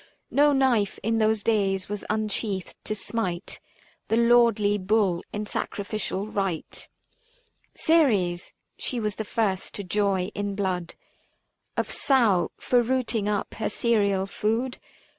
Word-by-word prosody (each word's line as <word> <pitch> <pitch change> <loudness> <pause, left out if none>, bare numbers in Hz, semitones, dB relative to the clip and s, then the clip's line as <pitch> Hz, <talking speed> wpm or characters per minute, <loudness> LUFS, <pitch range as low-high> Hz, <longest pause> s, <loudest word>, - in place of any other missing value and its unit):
No 290 +1 +5
knife 255 -7 +2
in 225 +1 +1
those 215 -1 +2
days 195 -4 +1
was 205 0 -5
unsheathed 210 -3 -2
to 215 - -1
smite 195 -5 -3 0.5
The 225 - +1
lordly 230 -3 +4
bull 190 -3 +1
in 210 0 -3
sacrificial 200 -1 -3
rite. 195 -6 -3 0.9
Ceres 210 - +2
— - - -51
she 250 - -2
was 210 -3 -2
the 220 - -2
first 205 -3 -1
to 200 - -3
joy 195 0 0
in 205 -1 -3
blood 185 -4 -2 0.8
375 - - 0
Of - - -7
sow, 230 -10 +3
for 245 -1 +2
rooting 235 -4 0
up 205 -1 -2
her 220 - -2
cereal 205 -4 +1
food. 225 +6 -1
210 Hz, 135 wpm, -26 LUFS, 195-230 Hz, 0.9 s, No